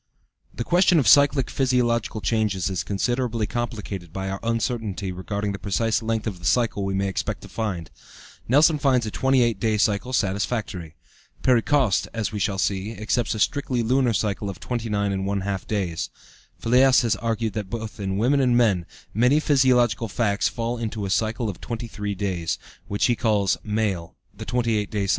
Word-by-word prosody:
The - - -4
question 175 +4 +4
of 135 -8 +2
cyclic 140 +3 +5
physiological 120 -4 +1
changes 100 -3 0
is 90 -3 -1
considerably 120 +2 -1
complicated 105 -7 -4
by 95 +1 -4
our 95 - -4
uncertainty 115 -4 -2
regarding 100 +3 -3
the 100 - -5
precise 110 +5 0
length 110 -1 -1
of 100 -5 -4
the 90 - -9
cycle 115 -5 +1
we 95 0 -1
may 100 0 0
expect 95 - -3
to - - -9
find. 95 -8 -4 0.6
Nelson 150 +5 +4
finds 130 -4 +2
a 110 - -4
28 125 -5 +2
day 110 0 +1
cycle 105 +4 +1
satisfactory. 100 -6 -2 0.5
Perry 125 -3 +4
Coste, 135 -6 +2
as 115 -2 -1
we 105 - -4
shall 100 0 0
see, 100 +3 -1
accepts 110 +2 0
a - - -4
strictly 125 0 0
lunar 125 0 +2
cycle 105 -1 -1
of 95 - -7
29½ 100 -4 -2
days. 95 -6 -2 0.5
Fliess 130 +2 +4
has 115 - +2
argued 115 -1 -2
that 105 -1 -3
in - - -19
both 110 0 -6
women 105 +8 +1
and 125 -3 +3
men, 100 -8 +2 0.3
many 125 +7 +4
physiological 125 -6 +3
facts 105 -1 0
fall 120 0 -3
into 110 -2 -3
a 95 - -3
cycle 110 +2 0
of 100 -4 -6
23 110 -4 -4
days, 90 -4 -2 0.3
which 100 0 0
he 120 - +3
calls 105 -5 +2
male, 105 -6 -2 0.2
the - - -8
28 - - -8
day 120 -2 +1
cycle 105 - +2
being 105 - -7
female. 105 - -1
(W. - - -2
110 Hz, 180 wpm, -24 LUFS, 100-120 Hz, 0.6 s, cyclic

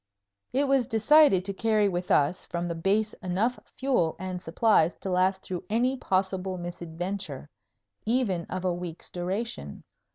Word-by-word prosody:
It 275 +2 +1
was 270 -3 +3
decided 225 -3 +5
to 200 - -3
carry 215 0 +2
with 180 -1 -2
us 145 +5 +2
from 175 0 -3
the 170 - -2
Base 200 +6 +1
enough 205 +7 0 0.2
fuel 255 -12 +1
and 185 -1 -5
supplies 170 -1 +3
to 190 - -5
last 185 +1 +2
through 180 -2 -4
any 245 +5 +2
possible 190 -4 -1
misadventure, 175 +2 -5 0.6
even 215 -8 0
of 185 0 -5
a 180 - +2
week's 175 -1 -7
duration. 180 - -4
190 Hz, 150 wpm, -27 LUFS, 175-220 Hz, 0.6 s, decided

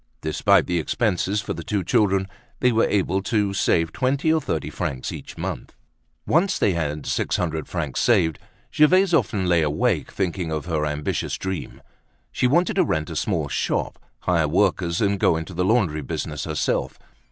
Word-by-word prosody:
Despite 100 +6 +3
the 90 -2 0
expenses 100 +2 0
for - - -4
the - - -6
two 100 -3 -1
children, 95 +1 +2 0.3
they 125 - +3
were 115 0 +3
able 95 -1 +1
to 105 -1 0
save 85 -4 +1
twenty 140 +5 +1
or 160 - +1
thirty - - -3
francs 65 -2 -3
each - - -9
month. - - -5 0.5
Once 180 +4 +2
they 100 - +2
had 75 -3 -3
six - - -1
hundred 80 -4 -2
francs 75 -7 -3
saved, 90 -10 +2 0.3
Gervaise 180 +4 +4
often 105 - +1
lay 85 -2 +3
awake 75 -1 0
thinking 90 -3 -2
of 80 0 -3
her 80 -3 -1
ambitious 75 0 -2
dream: 95 -3 -5 0.5
she 125 - +1
wanted 175 +8 +2
to - - +5
rent 80 -2 -2
a - - -5
small - - -1
shop, - - -2 0.2
hire 85 -4 +1
workers, 85 +1 +1
and 100 -2 +1
go 80 - +3
into 80 +3 -6
the 90 +2 -1
laundry 95 -7 +2
business 75 +1 -4
herself. 80 -1 -1
90 Hz, 175 wpm, -23 LUFS, 80-105 Hz, 0.5 s, to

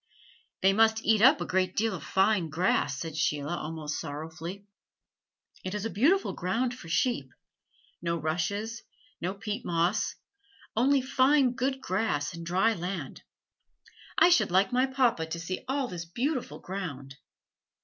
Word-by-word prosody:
"They 195 +1 +5
must 220 +1 +3
eat 220 -1 +4
up 270 +5 +6
a - - -1
great 185 0 0
deal 225 0 +1
of 170 -6 -6
fine 190 0 +2
grass," 155 -4 +1
said 160 +1 -5
Sheila 150 +1 0
almost 155 -2 -4
sorrowfully. 160 +5 -7 1.0
"It 185 +2 -4
is 210 +1 -3
a 225 - -2
beautiful 320 - +2
ground 230 +8 -1
for 205 -9 -11
sheep 165 - 0 0.7
no 170 0 -1
rushes, 180 +9 -2 0.4
no 185 +3 -2
peat 210 +3 -4
moss, 170 +4 0 0.6
only 265 +4 +3
fine 265 0 +4
good 265 +1 -1
grass 185 -7 -1
and 170 - -7
dry 185 +7 +2
land. 175 -6 -5 1.0
I - - +7
should 350 - +4
like 190 +4 +3
my 255 +2 +3
papa 250 -11 +1
to 170 +1 -4
see 175 +3 -4
all 270 0 0
this 175 -5 -6
beautiful 250 - -2
ground." 145 -8 -6
190 Hz, 150 wpm, -29 LUFS, 165-235 Hz, 1.0 s, I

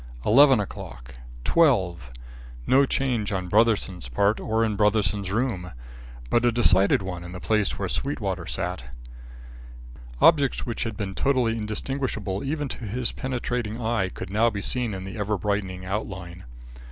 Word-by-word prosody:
Eleven 135 +2 +6
o'clock! - - -7 0.3
Twelve! 95 - +2 0.6
No 135 - +4
change 120 -8 0
on 95 -2 -2
Brotherson's 100 - +1
part 100 - +2
or 110 +1 +1
in 110 -2 -1
Brotherson's 105 -2 +1
room; 100 -5 -2 0.6
but 120 - +3
a 120 - +4
decided 100 -5 +4
one 90 -2 -5
in 90 +1 -9
the 90 - -6
place 105 0 0
where 95 - -2
Sweetwater 100 - -3
sat. 90 -6 -3 1.4
Objects 145 -5 +4
which 115 -1 -2
had 110 -2 -4
been 100 -3 -4
totally 130 -1 +1
indistinguishable 110 -2 -3
even 145 +1 -2
to 120 - -6
his 120 +4 -1
penetrating 125 -3 -3
eye 110 -5 0
could 95 0 -8
now 110 +3 +3
be 100 -2 -4
seen 120 -5 -1
in 95 +2 -7
ever 105 -1 -1
brightening 95 -1 -2
outline. 95 -3 -5
105 Hz, 145 wpm, -25 LUFS, 95-120 Hz, 1.4 s, Eleven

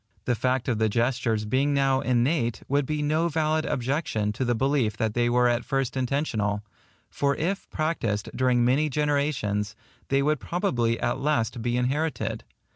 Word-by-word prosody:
The 125 - +2
fact 130 +2 0
of 120 -4 0
the 110 0 +2
gestures 115 -1 0
being 135 +6 +1
now 135 -1 +3
innate, 125 -1 +1
would 140 0 +1
be 150 -1 -1
no 155 +3 +1
valid 155 -1 0
objection 125 -5 -1
to 130 - -2
the 120 -1 +1
belief 125 -3 +1
that 110 -1 0
they 120 +1 +2
were 125 0 +3
at 120 0 +1
first 135 -2 -1
intentional; 120 -6 -1 0.5
for 140 0 +1
if 185 +7 -2
practised 115 -10 -1
during 125 -2 +2
many 140 +5 +2
generations, 140 -8 0 0.3
they 140 0 +2
would 150 0 +1
probably 120 - 0
at 120 - -1
last 125 -5 0
be 120 +1 0
inherited. 145 +6 -1
130 Hz, 165 wpm, -26 LUFS, 120-145 Hz, 0.5 s, now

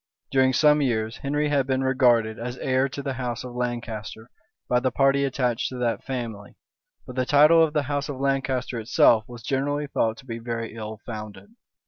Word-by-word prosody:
During 130 -1 +4
some 150 +3 +4
years, 110 -4 -1
Henry 145 +2 -1
had 140 -2 +1
been 130 0 0
regarded 120 -4 +2
as 120 +2 -5
heir 130 +1 +1
to 140 +1 -6
the 135 -1 -2
house 120 -1 -3
of 125 -1 -8
Lancaster 120 -2 -5 0.4
by 125 - +2
the 130 +1 +1
party 135 +2 +2
attached 125 -2 -1
to 130 - -7
that 120 -2 -1
family; 115 -6 -6 0.5
but 125 - -9
the 130 - +1
title 150 +5 +6
of 155 -2 0
the 150 -2 +1
house 145 +1 -2
of 135 -2 -5
Lancaster 135 -3 -1
itself 110 -1 +4
was 120 -1 -11
generally 145 +2 -1
thought 115 -5 -1
to 130 - -14
be 115 -2 -6
very 115 -1 -4
ill 110 -1 -7
founded. 110 - -8
130 Hz, 190 wpm, -25 LUFS, 115-140 Hz, 0.5 s, title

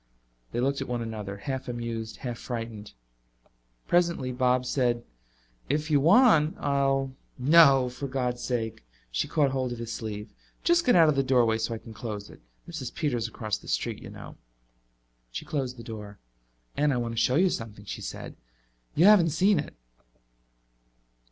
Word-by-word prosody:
They 120 - -2
looked 135 +2 0
at 135 - -4
one 120 -1 -2
another, 105 -3 -5
half 130 +5 -4
amused 115 -2 -4
half 120 -1 -4
frightened. 115 -3 -6 0.9
Presently 170 -7 +2
Bob 125 0 +2
said, 120 -2 0 0.7
"If 150 +3 -1
you 145 - +5
want, 165 - +5
I'll 135 -1 0
" - - -39 0.2
"No, 135 -6 +7
for 125 +3 -5
God's 125 -2 -2
sake." 110 - -3 0.3
She - - -1
caught 145 -4 +2
hold 130 -2 -1
of 120 - -4
his 115 0 -5
sleeve. 105 -1 -6 0.3
"Just 340 -3 +3
get 245 - +6
out 165 -2 +7
of 150 - +3
the 135 - +3
doorway 120 -4 +3
so 115 +1 -1
I - - -5
can 110 0 -12
close 105 -3 -6
it. - - -16 0.3
Mrs. - - -6
Peters 125 -7 -1
across 110 -3 -3
the - - -16
street, - - -2
you - - -9
know." - - -10 0.9
She - - -6
closed 130 -4 -3
the 115 - -9
door. 105 -3 -8 0.6
"And 145 0 +2
I 130 - 0
want 120 -1 -2
to 115 - 0
show 125 - +2
you 180 +3 +4
something," 105 -2 -6
she - - -6
said. - - -7 0.6
"You 165 - +5
haven't 200 -5 +7
seen 185 +4 +3
it." 145 - -6
125 Hz, 175 wpm, -27 LUFS, 115-145 Hz, 0.9 s, No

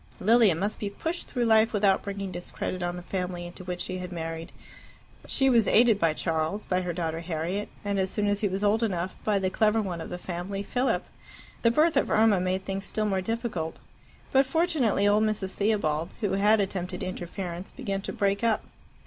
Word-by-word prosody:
Lilia 220 -3 +5
must 200 +6 -2
be 205 - -2
pushed 325 - -4
through 245 -2 -1
life 220 0 +4
without 200 -2 +3
bringing 200 -1 -5
discredit 180 +1 -4
on 175 0 -2
the 180 - -7
family 180 -1 -3
into 175 +1 -9
which 180 -1 -4
she 185 +1 -3
had 180 0 -6
married. 165 -1 -5 0.8
She 270 - +3
was 235 -5 +4
aided 225 -2 +5
by 165 -2 +2
Charles, 160 +5 -1
by 185 0 0
her 180 -1 -2
daughter 165 -1 -2
Harriet, 170 +4 -3 0.2
and, 200 -1 0
as 190 0 +1
soon 210 +2 -1
as 205 0 +1
he 210 - +1
was 195 +1 -2
old 210 +2 +3
enough, 185 -5 -1
by 210 -2 +2
the 190 -1 0
clever 215 +2 +3
one 180 -6 -3
of - - -6
the 180 - -4
family, 180 +3 -4
Philip. 250 +5 0 0.6
The 230 - +5
birth 310 +7 +3
of - - +2
Irma 215 -3 +4
made 185 +1 -1
things 195 0 -3
still 215 +1 -1
more 195 -2 +1
difficult. 215 -7 -3 0.5
But 270 0 +4
fortunately 270 - +2
old 210 +1 +4
Mrs. 210 -3 -1
Theobald, 180 -7 0
who 205 -3 0
had 205 +3 +4
attempted 185 -2 -2
interference, 180 0 -5
began 200 -8 -4
to - - -5
break 200 +1 0
up. 225 -2 +2
195 Hz, 200 wpm, -27 LUFS, 180-215 Hz, 0.8 s, Lilia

